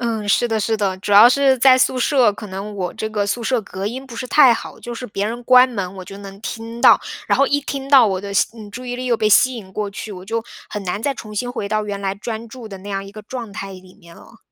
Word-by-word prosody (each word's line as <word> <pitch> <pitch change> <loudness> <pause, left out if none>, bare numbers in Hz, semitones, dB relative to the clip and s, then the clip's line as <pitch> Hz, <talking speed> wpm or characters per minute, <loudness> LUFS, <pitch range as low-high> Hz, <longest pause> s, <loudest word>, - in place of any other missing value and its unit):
嗯， 225 -3 -2
是 240 - +3
的 220 -2 -1
是 220 +2 0
的。 195 -3 -1
主 200 - -6
要 210 +4 +9
是 265 0 +3
在 260 0 +6
宿 260 0 +2
舍， 250 -4 +3
可 210 +1 -9
能 200 +2 -7
我 180 -2 -3
这 220 - -4
个 205 -2 -1
宿 235 +4 -2
舍 245 0 0
隔 195 0 -7
音 260 +5 -5
不 240 - -11
是 255 +2 -5
太 265 -6 +6
好， - - -8
就 240 - -7
是 250 - -7
别 200 +1 -2
人 240 +2 -5
关 255 +1 +6
门， 195 -5 -5
我 185 - -8
就 195 - -10
能 195 0 -11
听 230 +1 -7
到。 - - +7 0.3
然 - - +2
后 275 - +4
一 285 0 +1
听 275 -1 -5
到 270 -5 +7
我 190 -2 -1
的 200 0 -6
吸 - - +3
嗯， 210 -2 -10
注 250 +4 -8
意 245 - -3
力 255 +1 -5
又 240 - +2
被 215 -1 +1
吸 255 +4 +5
引 195 -5 -10
过 210 -1 -3
去， 205 +1 -7
我 185 0 -9
就 225 +2 -3 0.3
很 205 -2 -5
难 195 +4 -3
再 280 - 0
重 215 -3 -9
新 245 +4 -2
回 205 -4 -4
到 215 0 -1
原 200 -1 -5
来 195 0 -2
专 225 +2 -6
注 235 -2 -10
的 195 - -9
那 200 +2 -11
样 195 0 -3
一 195 - -10
个 215 +1 -11
状 230 -2 -7
态 195 -1 -6
里 185 0 -13
面 170 -4 -17
了。 230 - -17
220 Hz, 315 characters per minute, -20 LUFS, 200-245 Hz, 0.3 s, 要